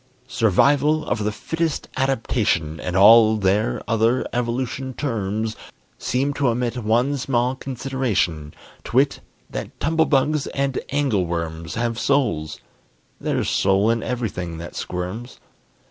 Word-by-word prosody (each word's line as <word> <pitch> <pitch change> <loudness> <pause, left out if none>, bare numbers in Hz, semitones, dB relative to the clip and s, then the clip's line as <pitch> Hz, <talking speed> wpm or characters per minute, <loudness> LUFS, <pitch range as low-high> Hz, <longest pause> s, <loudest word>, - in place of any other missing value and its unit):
Survival 145 +8 +3
of 110 - -1
the 105 - 0
fittest 165 +7 -2
adaptation, 115 - 0
And 90 +4 -4
all 110 +2 +7
their 105 +2 +1
other 115 +2 +2
evolution 125 +2 -2
terms, 110 -5 -2 0.4
Seem 135 +3 0
to 140 -1 0
omit 120 0 0
one 120 +5 +1
small 125 -1 0
consideration, 125 - -2 0.3
To - - -7
wit, 135 +2 +3 0.3
that - - -6
tumblebugs 150 -2 +2
and 140 -1 0
angleworms 85 - -1
Have 115 0 -1
souls: 120 - 0 0.6
there's - - -1
soul 100 +3 +3
in 115 -1 0
everything 95 -9 -3
that 85 +1 -8
squirms. 90 +7 -5
115 Hz, 115 wpm, -22 LUFS, 100-135 Hz, 0.6 s, all